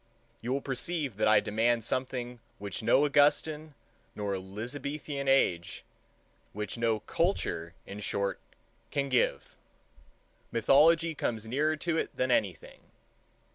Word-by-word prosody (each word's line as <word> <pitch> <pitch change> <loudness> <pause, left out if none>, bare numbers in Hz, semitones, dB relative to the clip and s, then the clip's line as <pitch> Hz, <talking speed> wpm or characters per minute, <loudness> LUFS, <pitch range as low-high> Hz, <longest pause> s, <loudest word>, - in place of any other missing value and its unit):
You 120 - -3
will 140 +1 0
perceive 140 - -2
that 110 - +2
I 110 -1 +6
demand 115 +2 +1
something 125 0 -3 0.2
which 100 -3 -5
no 130 +6 +4
Augustan 150 +1 +2 0.4
nor 100 -1 -2
Elizabethan 135 +9 -5
age, 90 -11 +2 0.7
which 105 -1 -4
no 115 -2 0
culture, 110 - -1
in 100 +1 -8
short, 100 0 -2 0.5
can 140 -1 -1
give. 125 -2 0 1.0
Mythology 160 +8 +4
comes 115 -6 -2
nearer 150 +7 +1
to 165 +1 -1
it - - -4
than 130 0 0
anything. 95 -8 -1
125 Hz, 120 wpm, -30 LUFS, 105-145 Hz, 1.0 s, I